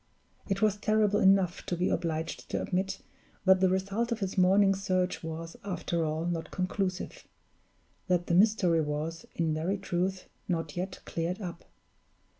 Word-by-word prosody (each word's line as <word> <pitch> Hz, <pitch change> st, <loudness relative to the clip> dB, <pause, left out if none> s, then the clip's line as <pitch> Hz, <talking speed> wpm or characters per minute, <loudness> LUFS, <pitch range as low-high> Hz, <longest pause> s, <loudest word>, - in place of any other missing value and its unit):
It 195 Hz, +1 st, 0 dB
was 210 Hz, -1 st, +3 dB
terrible 210 Hz, -1 st, +2 dB
enough 190 Hz, -2 st, +4 dB
to 175 Hz, -, -1 dB
be 180 Hz, -, +1 dB
obliged 160 Hz, -1 st, -2 dB
to -, -, -1 dB
admit 190 Hz, +1 st, -2 dB, 0.4 s
that 190 Hz, 0 st, +6 dB
the 190 Hz, 0 st, +4 dB
result 195 Hz, +6 st, 0 dB
of 230 Hz, -, -1 dB
his 195 Hz, -2 st, -2 dB
morning's 195 Hz, +1 st, +4 dB
search 185 Hz, -2 st, 0 dB
was, 165 Hz, +1 st, -6 dB
after 175 Hz, -3 st, -2 dB
all, 155 Hz, +1 st, -1 dB
not 170 Hz, -2 st, -2 dB
conclusive 185 Hz, 0 st, -3 dB, 0.8 s
that 180 Hz, -1 st, +2 dB
the -, -, -1 dB
mystery 185 Hz, -4 st, +4 dB
was, 155 Hz, +2 st, -3 dB
in 165 Hz, -2 st, +1 dB
very 170 Hz, +6 st, -1 dB
truth, 185 Hz, 0 st, -2 dB, 0.2 s
not 165 Hz, -4 st, -2 dB
yet 185 Hz, +1 st, -4 dB
cleared 170 Hz, +4 st, -2 dB
up. 175 Hz, -4 st, -7 dB
185 Hz, 155 wpm, -30 LUFS, 165-195 Hz, 0.8 s, that